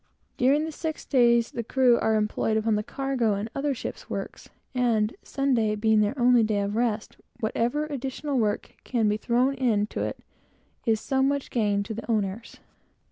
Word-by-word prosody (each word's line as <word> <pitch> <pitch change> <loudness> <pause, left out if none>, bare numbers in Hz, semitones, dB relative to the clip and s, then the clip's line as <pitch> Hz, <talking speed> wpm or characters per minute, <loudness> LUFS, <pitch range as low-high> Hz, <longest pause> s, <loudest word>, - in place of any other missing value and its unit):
During 280 +5 +3
the 320 - -4
six 315 0 -5
days, 235 -3 +3
the 235 - -4
crew 250 0 +3
are 220 - +2
employed 215 +1 0
upon 220 0 +1
the 210 - +1
cargo 255 -3 -1
and 210 +3 -4
other 275 0 -1
ship's - - -7
works, - - -6 0.2
and 230 -4 +2
the - - -17
Sabbath, 230 -6 +1
being 220 0 +3
their 210 +6 +1
only 245 -1 +5
day 215 -2 +1
of 200 +1 -2
rest, 225 -2 -1 0.2
whatever 240 +6 0
additional 275 -1 -3
work 210 -2 -1
can 230 -4 0
be 210 0 +1
thrown 245 +5 +1
into 225 -6 0
Sunday, - - -2 0.7
is 220 -1 +3
so 265 +3 0
much 280 +1 0
gain 205 -4 +1
to 220 - -6
the 225 +2 -8
owners. 215 0 -2
235 Hz, 180 wpm, -26 LUFS, 215-265 Hz, 0.7 s, only